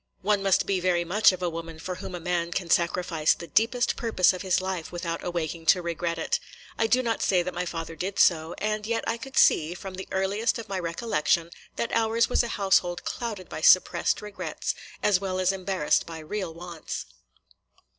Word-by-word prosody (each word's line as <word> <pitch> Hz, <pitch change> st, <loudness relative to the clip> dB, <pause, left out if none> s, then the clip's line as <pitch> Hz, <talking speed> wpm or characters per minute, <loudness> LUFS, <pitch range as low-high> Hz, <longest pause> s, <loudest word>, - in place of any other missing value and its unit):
One 205 Hz, 0 st, +2 dB
must 195 Hz, -2 st, +3 dB
be 195 Hz, -2 st, 0 dB
very 175 Hz, -1 st, +1 dB
much 200 Hz, +6 st, +5 dB
of 185 Hz, -1 st, -6 dB
a 175 Hz, -, +1 dB
woman 165 Hz, 0 st, -7 dB
for 180 Hz, +3 st, -5 dB
whom 185 Hz, 0 st, -7 dB
a -, -, -5 dB
man 170 Hz, 0 st, -1 dB
cam 170 Hz, -1 st, -3 dB
sacrifice 170 Hz, -2 st, +2 dB
the 170 Hz, -, -8 dB
deepest 235 Hz, +6 st, +1 dB
purpose 220 Hz, -6 st, +3 dB
of 185 Hz, -, -6 dB
his 190 Hz, -3 st, +2 dB
life 185 Hz, -3 st, -4 dB
without 170 Hz, -1 st, -4 dB
awaking 165 Hz, -2 st, -3 dB
to 180 Hz, -, +5 dB
regret 170 Hz, 0 st, -2 dB
it. 165 Hz, -, 0 dB, 0.4 s
I 225 Hz, -, +1 dB
do 255 Hz, +3 st, +3 dB
not 230 Hz, -2 st, -1 dB
say 180 Hz, -3 st, +3 dB
that 180 Hz, +1 st, -4 dB
my 180 Hz, +1 st, -3 dB
father 165 Hz, -1 st, -5 dB
did 190 Hz, +5 st, -4 dB
so; 160 Hz, -1 st, +3 dB
and 215 Hz, 0 st, -2 dB
yet 230 Hz, 0 st, -1 dB
I 230 Hz, -, -1 dB
could 270 Hz, +3 st, -9 dB
see, 160 Hz, +3 st, +4 dB
from 190 Hz, +1 st, -8 dB
the 190 Hz, +1 st, -7 dB
earliest 195 Hz, +6 st, 0 dB
of 230 Hz, -, -7 dB
my 195 Hz, -2 st, -3 dB
recollection, 170 Hz, -2 st, 0 dB, 0.2 s
that -, -, -3 dB
ours 230 Hz, 0 st, +2 dB
was -, -, +3 dB
a 235 Hz, -, -2 dB
household 180 Hz, -3 st, +2 dB
clouded 215 Hz, -6 st, -4 dB
by -, -, -6 dB
suppressed 185 Hz, +4 st, +4 dB
regrets, 210 Hz, -1 st, -4 dB, 0.3 s
as 200 Hz, -3 st, +3 dB
well 185 Hz, -1 st, -2 dB
as 185 Hz, 0 st, +3 dB
embarrassed 190 Hz, -5 st, 0 dB
by 165 Hz, -1 st, -7 dB
real 175 Hz, +3 st, -4 dB
wants. 170 Hz, 0 st, -7 dB
185 Hz, 205 wpm, -26 LUFS, 170-205 Hz, 0.4 s, much